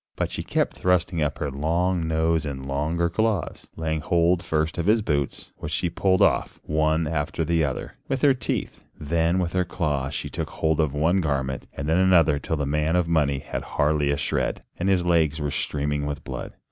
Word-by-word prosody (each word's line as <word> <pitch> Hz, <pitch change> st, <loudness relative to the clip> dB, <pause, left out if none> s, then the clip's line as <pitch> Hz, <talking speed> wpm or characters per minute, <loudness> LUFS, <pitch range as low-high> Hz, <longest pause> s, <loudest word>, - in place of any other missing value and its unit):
But -, -, -2 dB
she -, -, -3 dB
kept -, -, -1 dB
thrusting 90 Hz, -2 st, +1 dB
up 75 Hz, -, 0 dB
her 70 Hz, -, -3 dB
long 85 Hz, +4 st, 0 dB
nose 80 Hz, 0 st, +1 dB
and 70 Hz, -3 st, -5 dB
longer 75 Hz, +5 st, 0 dB
claws, 110 Hz, +4 st, -1 dB
laying 80 Hz, -1 st, -2 dB
hold 85 Hz, +3 st, +2 dB
first 80 Hz, 0 st, -1 dB
of 85 Hz, -, -1 dB
his 110 Hz, +1 st, +4 dB
boots, 70 Hz, -6 st, -2 dB
which -, -, -6 dB
she 85 Hz, -, 0 dB
pulled 95 Hz, +1 st, +3 dB
off, -, -, +1 dB
one 80 Hz, +1 st, +1 dB
after 80 Hz, +1 st, -1 dB
the 85 Hz, 0 st, +1 dB
other, 70 Hz, -3 st, -3 dB
with 135 Hz, -1 st, -2 dB
her 140 Hz, -2 st, +6 dB
teeth, 125 Hz, -4 st, -3 dB, 0.2 s
then 80 Hz, +3 st, +1 dB
with 90 Hz, -2 st, -1 dB
her 90 Hz, -1 st, +2 dB
claws 75 Hz, -6 st, -2 dB
she -, -, -3 dB
took -, -, -4 dB
hold 80 Hz, 0 st, 0 dB
of 75 Hz, -3 st, +1 dB
one 85 Hz, +6 st, +2 dB
garment 65 Hz, -4 st, -2 dB
and 70 Hz, -, -5 dB
then 80 Hz, +3 st, +3 dB
another 85 Hz, -6 st, +4 dB
till 80 Hz, -, -2 dB
the 75 Hz, -, -1 dB
man 75 Hz, +3 st, +1 dB
of 90 Hz, -2 st, +2 dB
money 75 Hz, -4 st, +2 dB
had -, -, -4 dB
hardly 75 Hz, -1 st, +1 dB
a 70 Hz, -, +1 dB
shred, 75 Hz, -, -1 dB
and 95 Hz, +2 st, -1 dB
his 90 Hz, -2 st, +2 dB
legs 80 Hz, -3 st, +2 dB
were 75 Hz, -1 st, -2 dB
streaming 75 Hz, 0 st, -1 dB
with 75 Hz, -, -4 dB
blood. -, -, -6 dB
80 Hz, 205 wpm, -25 LUFS, 75-85 Hz, 0.2 s, her